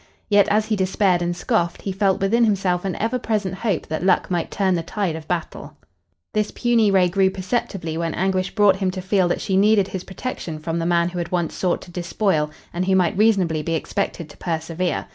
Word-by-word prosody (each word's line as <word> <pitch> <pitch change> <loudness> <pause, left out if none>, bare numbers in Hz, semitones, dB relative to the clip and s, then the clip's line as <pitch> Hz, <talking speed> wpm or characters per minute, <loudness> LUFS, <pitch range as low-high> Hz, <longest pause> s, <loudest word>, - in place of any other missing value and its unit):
Yet, 205 -1 +5
as 215 +1 +2
he 220 0 0
despaired 190 -2 +1
and 175 0 -1
scoffed, 180 -6 -1
he 195 - -2
felt 195 0 +1
within 225 +5 +3
himself 195 -4 +1
an 185 -3 -2
ever 230 +3 -1
present 210 -5 -1
hope 195 -3 -2
that 155 +2 -4
luck 185 0 +2
might 175 -2 -1
turn 190 -2 +1
the 170 - 0
tide 175 0 -2
of 160 -1 -8
battle. 175 -2 -4 0.6
This 210 -1 0
puny 235 -3 +2
ray 190 -2 +4
grew 190 +2 +2
perceptibly 185 -4 -3
when 165 -1 -2
Anguish 185 0 -1
brought 205 -3 +5
him 190 -1 0
to 185 +1 -4
feel 190 -1 +2
that 175 - -1
she 190 - -1
needed 200 0 +4
his 185 -2 -5
protection 190 -5 -5
from 165 +2 -3
the 165 - -1
man 170 0 +2
who 175 0 -5
had 170 - -4
once 175 -3 -1
sought 180 -2 -1
to 175 - -13
despoil 175 -3 0 0.2
and 180 +2 -2
who 190 - +3
might 185 +1 +2
reasonably 190 -7 +2
be 165 +2 -1
expected 170 0 -3
to - - -16
persevere. 165 +1 -2
185 Hz, 220 wpm, -22 LUFS, 175-200 Hz, 0.6 s, Yet